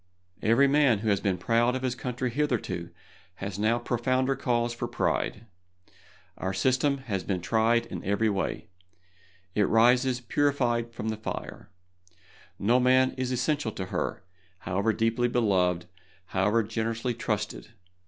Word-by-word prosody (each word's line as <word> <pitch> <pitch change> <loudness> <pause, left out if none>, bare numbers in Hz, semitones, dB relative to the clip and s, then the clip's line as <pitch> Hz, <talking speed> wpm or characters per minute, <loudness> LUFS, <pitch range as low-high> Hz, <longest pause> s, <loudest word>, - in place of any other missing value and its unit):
Every 115 +6 +4
man 135 -7 +3
who - - +2
has 100 -1 +2
been 95 -3 0
proud 120 +4 +2
of 130 - -4
his 130 -2 0
country 125 0 -3
hitherto 115 - -1 0.5
has 95 0 -5
now 110 +3 +2
profounder 130 +3 0
cause 120 -2 0
for 120 0 -4
pride. 115 -1 -1 0.9
Our 95 0 -2
system 135 +2 +2
has 100 -5 -2
been 95 -3 -1
tried 115 +5 +2
in - - -7
every 100 +3 +1
way; 100 +1 -2 0.9
it 105 -2 +2
rises 125 +3 +4
purified 125 -3 0
from 110 -1 -4
the 110 - -3
fire. 110 - -6 0.9
No 115 +5 +3
one 125 - +2
man 130 0 +4
is 130 -1 -3
essential 125 -1 0
to 95 - -4
her, 110 -1 -2 0.4
however 100 +4 0
deeply 115 +2 +1
beloved, 95 -8 +1 0.4
however 105 +4 +2
generously 115 +3 -2
trusted. 105 -2 -3
115 Hz, 145 wpm, -27 LUFS, 105-125 Hz, 0.9 s, Every